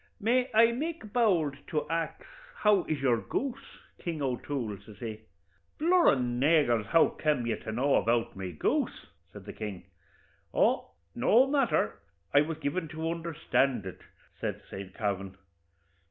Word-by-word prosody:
May 250 +4 +2
I 230 +1 +7
make 280 -4 -4
bowld 175 - +2
to 150 -2 -2
ax 165 0 -3 0.3
how 210 -4 +3
is 155 -2 -2
your 125 -3 +4
goose, 270 - -4 0.2
King 165 -3 -4
O'Toole?' 125 -5 -3
says 105 -3 -14
he. 110 -1 -6 0.6
'Blur 345 +3 +5
an 125 -2 -1
agers, 140 -8 +3
how 165 - +5
kem 150 -6 0
ye 115 - 0
to - - -6
know 130 +5 +1
about 115 0 +1
my 95 -1 -5
goose?' 80 - -1 0.3
says 105 -1 -11
the 105 - -8
king. 105 -5 -6 0.7
'Oh, - - +2 0.2
no 225 - +5
matther; 270 - +1 0.3
I 145 - +7
was 155 +1 -2
given 160 +4 -2
to 160 +2 -3
understand 150 - 0
it,' 95 - -8 0.4
says - - -2 0.2
Saint 95 -1 -8
Kavin. 100 -2 -3
145 Hz, 150 wpm, -29 LUFS, 115-185 Hz, 0.7 s, I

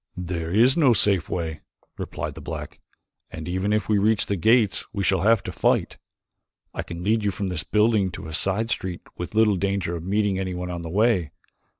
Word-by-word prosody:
"There 85 -2 -4
is 120 +7 +5
no 140 -7 +5
safe 95 -4 +2
way," 80 -3 -3 0.3
replied - - -5
the - - -10
black, - - -7 0.5
"and 80 0 -7
even 95 +3 -1
if 105 0 +1
we 105 -2 +3
reach 110 +1 +2
the 100 - -1
gates 110 +3 +3
we 100 -2 -2
shall 95 -1 +2
have 110 0 +4
to - - -5
fight. - - 0 0.7
I - - -3
can 85 +1 -7
lead 110 +2 +1
you 105 - +2
from 100 0 -3
this 90 -4 -2
building 105 -2 +2
to - - -7
a 80 - -7
side 100 +7 -1
street 90 -2 -3
with 90 +4 -6
little 110 -3 +4
danger 95 -2 -1
of 85 - -6
meeting 100 0 0
anyone 90 -1 -3
on 85 -1 -4
the 85 - -6
way. 100 -3 +2
95 Hz, 205 wpm, -24 LUFS, 90-105 Hz, 0.7 s, is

